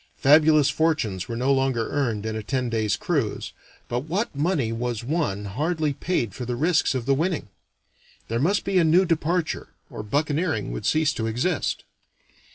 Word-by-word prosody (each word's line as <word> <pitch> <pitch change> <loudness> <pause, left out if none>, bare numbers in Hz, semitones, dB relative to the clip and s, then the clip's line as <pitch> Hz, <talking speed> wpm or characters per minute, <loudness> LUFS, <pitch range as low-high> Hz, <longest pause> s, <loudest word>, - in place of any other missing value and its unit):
Fabulous 150 0 +5
fortunes 125 - 0
were 115 - -4
no 130 +3 +2
longer 130 -4 0
earned 115 -7 -1
in 110 0 -2
a 110 - -3
ten 125 +2 -2
days' 110 -3 +1
cruise, - - -2 0.3
but 120 - -1
what 185 +3 -2
money 145 -6 0
was 115 -1 -3
won 120 - -1
hardly 150 - -1
paid 135 - -2
for 125 - -6
the 120 0 -3
risks 155 0 +2
of 125 -3 -2
the 135 - +3
winning. 160 - -1 0.8
There 115 +1 -1
must 190 +9 +1
be 195 -1 +2
a - - +4
new 170 +4 +4
departure, 165 0 -1 0.2
or - - -6
buccaneering 145 - -1
would - - -4
cease 155 0 +2
to 110 -4 -2
exist. 130 +9 -1
140 Hz, 170 wpm, -24 LUFS, 115-160 Hz, 0.8 s, Fabulous